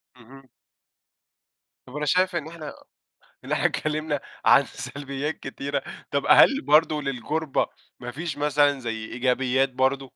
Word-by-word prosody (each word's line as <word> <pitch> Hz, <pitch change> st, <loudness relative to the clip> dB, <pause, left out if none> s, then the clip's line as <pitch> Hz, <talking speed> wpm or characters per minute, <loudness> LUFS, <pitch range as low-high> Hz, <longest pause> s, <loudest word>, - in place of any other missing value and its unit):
اهم. 130 Hz, +2 st, -16 dB, 1.4 s
طب 130 Hz, -, -12 dB
أنا 150 Hz, 0 st, -2 dB
شايف 185 Hz, +3 st, +2 dB
إن 155 Hz, -3 st, -2 dB
إحنا 160 Hz, -3 st, -8 dB, 0.7 s
إن -, -, -8 dB
إحنا -, -, +1 dB
اتكلمنا 155 Hz, -1 st, -1 dB, 0.3 s
عن -, -, +6 dB
سلبيات 140 Hz, +2 st, -5 dB
كتيرة، 140 Hz, +1 st, -4 dB, 0.3 s
طَب 140 Hz, 0 st, 0 dB
هل 275 Hz, +1 st, +7 dB
برضو 155 Hz, -, +3 dB
للغُربة، 140 Hz, +3 st, -1 dB, 0.3 s
ما 125 Hz, -1 st, -6 dB
فيش 155 Hz, +4 st, -5 dB
مثلًا 145 Hz, -1 st, +2 dB
زي 115 Hz, -3 st, -4 dB
إيجابيات 130 Hz, +2 st, +1 dB
برضو؟ 135 Hz, +1 st, 0 dB
140 Hz, 130 wpm, -25 LUFS, 130-155 Hz, 1.4 s, هل